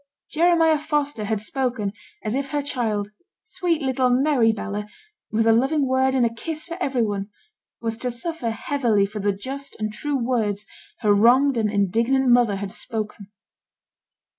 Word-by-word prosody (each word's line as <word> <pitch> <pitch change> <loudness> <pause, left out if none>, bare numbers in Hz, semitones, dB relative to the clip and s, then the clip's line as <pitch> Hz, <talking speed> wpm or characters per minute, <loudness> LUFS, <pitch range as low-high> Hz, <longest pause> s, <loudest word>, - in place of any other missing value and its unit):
Jeremiah 325 -1 +4
Foster 290 -7 -1
had 215 0 -1
spoken 225 -3 -2 0.3
as 215 - -2
if 275 +1 -2
her 290 0 -1
child, 220 -7 -2 0.3
sweet 355 -7 -1
little 260 -1 +2
merry 250 -2 +3
Bella, 210 -1 -4 0.4
with 225 +1 +1
a 225 - +6
loving 270 +4 +2
word 260 0 +2
and 250 -2 +3
a 230 - 0
kiss 310 +6 -5
for 335 - -6
every 265 -7 +1
one, 200 -1 -2 0.5
was 225 -1 -2
to 250 +2 -2
suffer 245 +1 -3
heavily 225 -3 +1
for 210 +2 -6
the 205 0 +1
just 265 +8 -7
and 215 0 -2
true 285 +6 -2
words 225 -5 -1 0.4
her 210 -3 +4
wronged 250 +6 +5
and 220 -2 +1
indignant 230 +7 +2
mother 240 -4 +4
had 195 0 -5
spoken. 215 -3 -5
240 Hz, 165 wpm, -23 LUFS, 215-275 Hz, 0.5 s, a